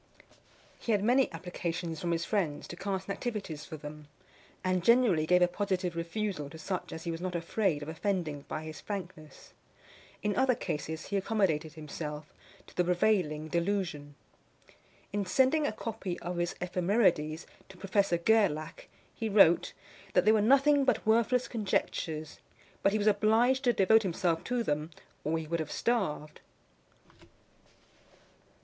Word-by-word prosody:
He 230 - 0
had 200 -1 +1
many 255 +4 +3
applications 170 -1 -4
from 175 - -2
his 170 0 0
friends 175 -9 -1
to - - -6
cast 190 0 -3
nativities 195 - -4
for 160 -4 -8
them, 150 0 -9 0.6
and 185 -1 0
generally 225 -9 +4
gave 180 +1 +5
a - - +5
positive 185 -2 -2
refusal 170 -2 -3
to 160 - -10
such 180 +3 -4
as 160 - -7
he 170 - -2
was 165 +1 -5
not 180 -1 -3
afraid 170 -2 0
of - - -8
offending 160 -3 -2
by 155 - -4
his 155 0 -8
frankness. 175 -7 -8 0.7
In 210 -1 0
other 260 -1 +3
cases 160 -4 -4
he 200 - 0
accommodated 185 -7 0
himself 150 -1 -7 0.3
to - - -18
the 180 - +3
prevailing 175 -4 +1
delusion. 170 -5 -2 1.0
In 205 0 0
sending 265 +9 +3
a - - -1
copy 215 -5 -5
of 175 +1 -4
his 175 0 -1
Ephemerides 180 -3 +1 0.2
to 190 - -13
Professor 195 -1 +1
Gerlach, 210 - +1 0.3
he 225 -2 -3
wrote, 195 -5 +5 0.4
that - - +4
they 215 - +7
were 220 -1 +4
nothing 275 +5 +5
but 260 - +1
worthless 235 +3 +3
conjectures; 165 -7 -2 0.4
but 195 - +3
he 215 - +1
was 210 - -1
obliged 225 +5 +3
to 245 - +5
devote 220 +1 +5
himself 175 -3 0
to 245 -1 0
them, 150 -3 -1 0.3
or 160 +2 0
he 160 - -4
would 170 +2 -2
have 155 -2 -4
starved. 185 -11 -1
180 Hz, 155 wpm, -30 LUFS, 160-215 Hz, 1.0 s, they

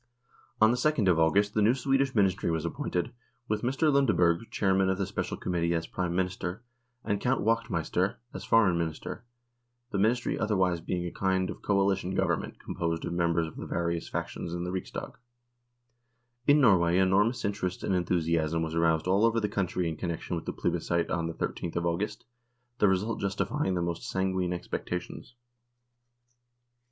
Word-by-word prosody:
On 110 +1 +6
the 125 - 0
2nd 135 -7 +2
of 80 - +2
August 100 +6 +3
the 105 - +2
new 110 +4 +4
Swedish 135 0 +1
Ministry 95 -4 +2
was 80 -1 -1
appointed, 90 +5 -2 0.3
with 105 0 -1
Mr. 135 +5 +2
Lundeberg, 95 -8 +3
chairman 95 -1 +2
of 95 - +1
the 100 - 0
Special - - -3
Committee, 85 -1 0
as 80 0 -1
Prime 90 -1 -3
Minister, 90 +3 -2 0.4
and 100 -2 -1
Count 130 +2 +1
Wachtmeister 100 -5 0 0.2
as - - -6
Foreign 100 -7 +4
Minister, 85 +7 -4 0.7
the 100 - -1
Ministry 120 +4 +1
otherwise 95 -5 +1
being 90 +1 -2
a 85 - -4
kind 95 -1 0
of - - -10
coalition 95 -2 +1
Government - - -1
com - - -7
posed 85 -1 -2
of - - -3
members 85 -1 +1
of 80 - -9
the - - -6
various 85 -1 -2
factions 85 - -4
in 85 - -3
the 90 - -3
Riksdag. 95 -1 -5 1.3
In 145 +1 +6
Norway 90 -9 +4
enormous 100 +6 +2
interest 95 -3 -2
and - - 0
enthusiasm 85 -2 +1
was 80 0 -3
aroused 80 -1 +2
all 95 +3 +3
over 115 0 +3
the 105 - 0
country 90 -3 -1
in 80 -2 -3
connection 85 0 -3
with 85 - -5
the - - -3
plebiscite 85 -1 -1
on 85 -1 0
the 85 - -5
I3th 85 - -4
of 85 0 -1
August, 100 +7 -2 0.5
the 105 - +5
result 100 +4 0
justifying 100 +2 -1
the 85 - 0
most 85 -1 -3
sanguine 95 -1 0
expectations. 90 +5 -5
95 Hz, 170 wpm, -29 LUFS, 85-105 Hz, 1.3 s, On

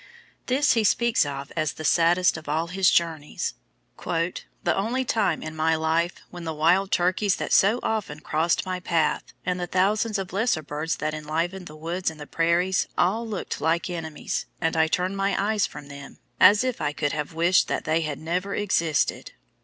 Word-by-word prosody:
This 275 +3 +3
he 225 -2 +2
speaks 230 -5 +2
of 140 0 -6
as 155 -3 0
the 155 - -7
saddest 175 +3 +4
of 160 -2 -8
all 160 +3 0
his 185 +1 +3
journeys 160 -3 0 0.5
"the 170 +1 -2
only 240 +6 -1
time 200 -9 0
in 155 0 -6
my 160 +1 +2
life 160 +2 0 0.2
when 175 -1 -8
the 160 -1 -4
wild 180 +6 +3
turkeys 185 +3 +2
that - - -3
so 210 +5 +5
often 205 -9 -2
crossed 160 +3 0
my 185 -1 -3
path, 170 -3 0 0.2
and 180 0 -1
the 175 - -3
thousands 205 +4 +1
of 190 -2 -5
lesser 200 -6 +1
birds 150 +3 -3
that 155 0 -3
enlivened 165 +5 -3
the 150 - -11
woods 170 +4 -2
and 160 -1 -11
the 150 - -7
prairies, 170 +4 +1
all 220 +6 +1
looked 210 -8 -4
like 165 +3 0
enemies, 160 -3 -4
and 165 -1 0
I 160 0 +3
turned 180 +4 -1
my 195 0 0
eyes 205 0 +1
from 150 -1 -10
them, 140 -1 -11 0.2
as 205 +5 +7
if 255 -2 -2
I 150 -1 -1
could 145 -1 -1
have 150 +1 -4
wished 170 +2 +3
that - - -2
they 160 +1 +1
had 150 -3 -3
never 180 +5 -2
existed." 165 -7 0
170 Hz, 190 wpm, -25 LUFS, 155-195 Hz, 0.5 s, as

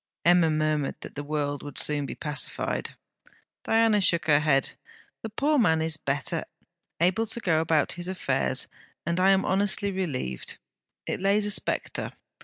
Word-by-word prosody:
Emma 175 -1 +5
murmured 155 -2 0
that - - -9
the 145 - -5
world 145 -1 -2
would 145 - -9
soon 145 -2 +1
be - - -6
pacified. 150 -1 -2 0.7
Diana 225 -2 +3
shook 170 -3 +3
her 150 -2 +5
head. 140 -3 +2 0.5
'The 225 - -5
poor 285 +7 +1
man 160 -8 +3
is 160 0 -1
better; 140 -2 -2 0.5
able 185 +7 +2
to 225 - -1
go 165 -7 +1
about 160 -1 +1
his 175 0 -6
affairs; 185 0 0 0.4
and 170 +2 0
I 190 +1 +5
am 195 0 +3
honestly 200 +1 +1
relieved. 140 - -4 0.5
It - - -3
lays 200 +2 +3
a 210 - +2
spectre. - - -1
170 Hz, 160 wpm, -26 LUFS, 150-195 Hz, 0.7 s, Emma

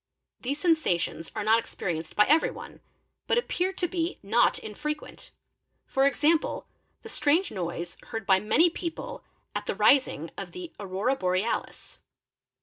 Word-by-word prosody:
These 280 +4 -3
sensations 300 - +1
are 215 - -2
not 220 +2 +5
experienced 165 -7 -4
by 210 - +6
everyone, 315 +3 +1 0.2
| - - -50
but - - +3
appear 375 -6 0
to 360 -2 -1
be 345 -1 -2
not 225 +4 +3
infrequent, 300 +8 -6 0.7
e.g., 275 +1 +3
the 310 +2 +2 0.4
strange 340 -4 +1
noise 175 -2 -4
heard 225 -2 -5
by 190 -2 +5
many 320 - +4
people 365 +9 -5 0.3
at - - -4
the - - -1
rising 275 -2 +3
of - - -7
the 360 -2 -8
Aurora 200 +6 0
Borealis. 185 +1 -2
270 Hz, 140 wpm, -28 LUFS, 200-330 Hz, 0.7 s, by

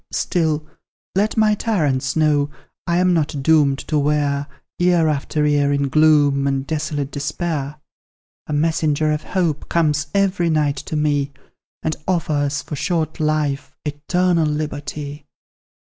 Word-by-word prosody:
"Still, 155 -4 0 0.5
let 205 +4 0
my 215 -1 +4
tyrants 150 - 0
know, 150 -2 +2 0.4
I 170 0 +2
am 180 0 +3
not 150 -4 -1
doomed 145 -3 +4
to 150 - +1
wear 145 -1 0 0.3
Year 175 -2 +3
after 150 0 0
year 145 -1 +2
in 140 -1 0
gloom, 145 -2 +4
and 135 -1 -1
desolate 150 -2 -3
despair; 150 -1 -3 0.7
A - - -6
messenger 155 0 +1
of 150 0 -1
Hope 170 -6 -2
comes 155 -2 +1
every 190 -3 +2
night 150 -3 +1
to 155 - -5
me, 145 -2 +1 0.5
And 155 - -1
offers 145 -5 0
for 150 - -6
short 160 +1 -1
life, 150 -2 -1
eternal 165 +3 +1
liberty. 150 -1 -4
150 Hz, 135 wpm, -20 LUFS, 145-160 Hz, 0.7 s, my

